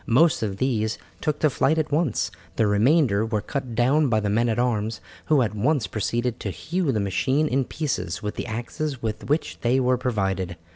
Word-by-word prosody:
Most 155 +8 +4
of 100 -3 -2
these 110 -3 0 0.2
took 150 -1 0
to 155 - +4
flight 155 +5 +2
at 155 -2 -1
once, 145 -10 +1 0.2
the 115 - +2
remainder 110 +1 +3
were 110 -1 -1
cut 130 +1 -4
down 135 +6 +3
by 110 -2 +3
the 105 -1 -1
men 115 +3 +2
at 110 - 0
arms, 115 -3 0 0.3
who 145 -4 +4
at 105 - -2
once 125 +4 +1
proceeded 120 +3 -2
to 100 - -3
hew 150 - -1
the 110 - 0
machine 130 +10 +1
in 135 -1 +1
pieces 130 - -3
with 105 - -2
the - - -5
axes 120 +4 -4
with 110 +2 -4
which 150 +3 0
they 125 +3 +2
were 125 -1 +2
provided. 95 -7 -1
120 Hz, 200 wpm, -24 LUFS, 105-140 Hz, 0.3 s, Most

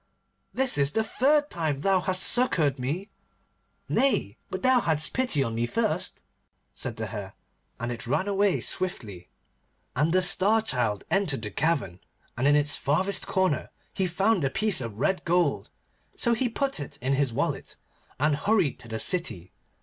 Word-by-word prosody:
this 260 - +2
is 140 +1 +2
the 220 - +1
third 290 +6 +2
time 155 -5 -2
thou 195 +2 +3
hast 185 0 +1
succoured 160 - +2
me.' 160 +11 -3 0.8
'Nay, 255 - +1
but 190 - -5
thou 255 -1 +5
hadst 155 -7 -1
pity 250 - +1
on 115 -3 -3
me 115 +1 -1
first,' 210 - -2 0.5
said - - -4
the 110 - -3
Hare, 100 -2 -7 0.4
and 120 +1 -3
it 120 0 -7
ran 185 +10 0
away 200 -1 +1
swiftly. 105 - -4 0.7
And 150 +5 +2
the 185 +1 +3
Star 200 +5 +4
Child 120 - -1
entered 165 - 0
the 105 - -4
cavern, 135 - -1 0.4
and 130 +4 +1
in 145 - +5
its 145 0 +3
farthest 185 +8 +1
corner 185 -8 0 0.2
he 190 -2 0
found 190 +3 +1
the 135 - +1
piece 205 0 0
of 115 -4 -6
red 185 - 0
gold. 170 -4 +1 0.5
So 235 - +3
he 245 +2 0
put 270 -3 -1
it 145 - -7
in 130 +3 -1
his 135 -2 +1
wallet, - - -3 0.4
and 150 +1 +2
hurried 185 - +1
to 120 - -11
the 110 0 -4
city. 100 - -1
160 Hz, 170 wpm, -26 LUFS, 130-200 Hz, 0.8 s, thou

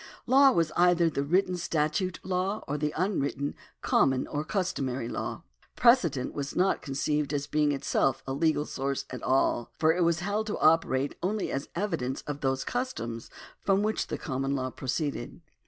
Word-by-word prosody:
Law 270 +2 +6
was 165 -10 +1
either 175 -1 +4
the 140 - -1
written 180 +5 +1
statute 170 +1 -1
law, 190 +3 -1
or 145 - -2
the 150 0 -1
unwritten, 145 -6 -1 0.3
common, 130 -1 +3
or 145 0 -3
customary 140 - -2
law. - - -4 0.3
Precedent 175 - +3
was 140 -1 -4
not 185 +2 +2
conceived 145 +1 -1
as 145 -1 -1
being 150 0 +1
itself 135 -1 0
a 135 - -3
legal 150 +1 +1
source 140 -1 -3
at 125 - -6
all, 130 -3 +1
for 160 0 +4
it 180 - -1
was 170 0 +2
held 205 +3 -1
to 210 - -2
operate 145 -4 +3
only 200 +3 -1
as 135 +2 -3
evidence 140 -9 -2
of 145 -1 -5
those 135 -1 0
customs 120 - -4 0.3
from 195 +1 +2
which 215 +1 -1
the - - -3
common 135 +1 -2
law 130 -1 -2
pro 130 - -9
ceeded. 145 +4 -2
150 Hz, 170 wpm, -28 LUFS, 135-185 Hz, 0.3 s, Law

